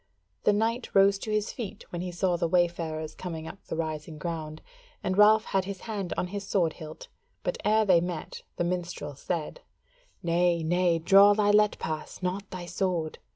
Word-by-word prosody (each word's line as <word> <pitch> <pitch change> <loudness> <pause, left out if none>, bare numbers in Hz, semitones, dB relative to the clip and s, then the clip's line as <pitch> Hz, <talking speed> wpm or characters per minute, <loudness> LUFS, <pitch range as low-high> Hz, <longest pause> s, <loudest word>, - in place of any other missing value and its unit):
The 210 - +5
knight 225 +4 -1
rose 195 0 +5
to 220 - -6
his 215 -1 0
feet 230 -6 -7
when 175 - -4
he 180 0 -4
saw 175 +1 +1
the 170 0 0
wayfarers 165 -3 0
coming 160 -3 -6
up 195 - -10
the - - -4
rising 155 -1 -4
ground, 155 -1 -5 0.4
and 185 - 0
Ralph 215 +2 +6
had 190 -1 0
his 195 -1 -6
hand 205 -5 -4
on - - 0
his 200 -1 -3
sword 180 -5 +1
hilt; 155 -2 -10 0.4
but - - -2
ere 215 +1 +3
they 180 -4 +5
met, 175 -3 -5
the - - -1
minstrel 175 -4 -3
said, 155 +3 -4 0.6
"Nay, 170 0 +2
nay, 175 +1 +2
draw 195 +5 +6
thy 205 -1 +3
let 210 0 +4
pass, 155 +3 -5
not 190 +2 -2
thy 180 -1 -6
sword. 175 -2 -2
180 Hz, 185 wpm, -28 LUFS, 165-200 Hz, 0.6 s, Ralph